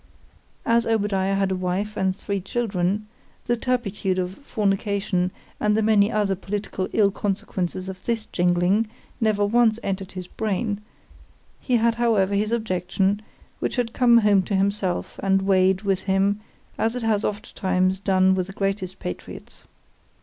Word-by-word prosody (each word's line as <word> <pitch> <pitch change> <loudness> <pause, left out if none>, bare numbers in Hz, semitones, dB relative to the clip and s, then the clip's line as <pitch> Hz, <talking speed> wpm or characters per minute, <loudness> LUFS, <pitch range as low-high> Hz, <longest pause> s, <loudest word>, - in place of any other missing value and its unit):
As 230 0 +3
Obadiah 200 -3 +1
had 195 -1 +1
a - - +1
wife 185 +4 -2
and 190 -1 0
three 200 -1 -3
children——the 210 +3 -2
turpitude 215 -6 -1
of 180 0 -1
fornication, 200 -6 0 0.3
and 210 0 +2
the 220 - +2
many 210 -1 +4
other 205 -2 +1
political 195 0 -3
ill 200 -2 +3
consequences 190 -2 -3
of 190 0 -7
this 230 -2 -1
jingling, 180 +5 +2 0.3
never 215 -2 +2
once 225 +1 +3
entered 195 -1 -3
his 185 -1 -6
brain,——he 210 +5 -5
had 230 0 +3
however 205 -5 +3
his 210 +2 +1
objection, 195 -2 0 0.4
which - - -1
came 240 -2 +5
home 210 -3 +5
to 195 +2 -2
himself, 195 -1 -1
and 195 0 +2
weighed 190 0 +3
with 195 -2 +1
him, 195 +1 +1 0.4
as 225 +2 +1
it 250 - -3
has 220 -2 +1
oft 205 0 -4
times 185 -1 +1
done 190 -1 +3
with 185 -1 -1
the 195 - -9
greatest 195 -2 -2
patriots. 90 - -8
200 Hz, 145 wpm, -24 LUFS, 190-215 Hz, 0.4 s, came